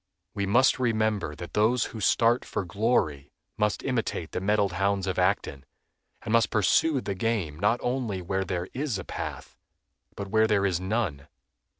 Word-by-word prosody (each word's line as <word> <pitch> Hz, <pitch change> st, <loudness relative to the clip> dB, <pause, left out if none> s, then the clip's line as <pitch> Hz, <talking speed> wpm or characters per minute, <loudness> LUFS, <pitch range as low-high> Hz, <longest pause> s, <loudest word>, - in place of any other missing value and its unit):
We 100 Hz, -2 st, -2 dB
must 130 Hz, +6 st, +4 dB
remember 110 Hz, -9 st, 0 dB
that 85 Hz, +2 st, -9 dB
those 110 Hz, +3 st, +3 dB
who 110 Hz, -, -6 dB
start 115 Hz, +4 st, +3 dB
for 100 Hz, -, -4 dB
glory 85 Hz, -, 0 dB, 0.3 s
must 105 Hz, -2 st, 0 dB
imitate 115 Hz, -10 st, -2 dB
the -, -, -3 dB
mettled 100 Hz, 0 st, +2 dB
hounds 100 Hz, +1 st, 0 dB
of 95 Hz, -1 st, -2 dB
Acton, 90 Hz, -7 st, 0 dB, 0.6 s
and 110 Hz, -, -3 dB
must 115 Hz, -1 st, +4 dB
pursue 130 Hz, -, +2 dB
the 100 Hz, -, -3 dB
game 95 Hz, -7 st, -2 dB
not 115 Hz, +5 st, +2 dB
only 120 Hz, -6 st, -1 dB
where 95 Hz, +2 st, -2 dB
there 90 Hz, -1 st, -3 dB
is 135 Hz, -5 st, -2 dB
a 95 Hz, -, -5 dB
path, -, -, -7 dB, 0.6 s
but 100 Hz, -, -5 dB
where 110 Hz, +2 st, +3 dB
there 100 Hz, -2 st, +2 dB
is 90 Hz, -3 st, +1 dB
none. 95 Hz, -8 st, -2 dB
100 Hz, 170 wpm, -27 LUFS, 90-115 Hz, 0.6 s, must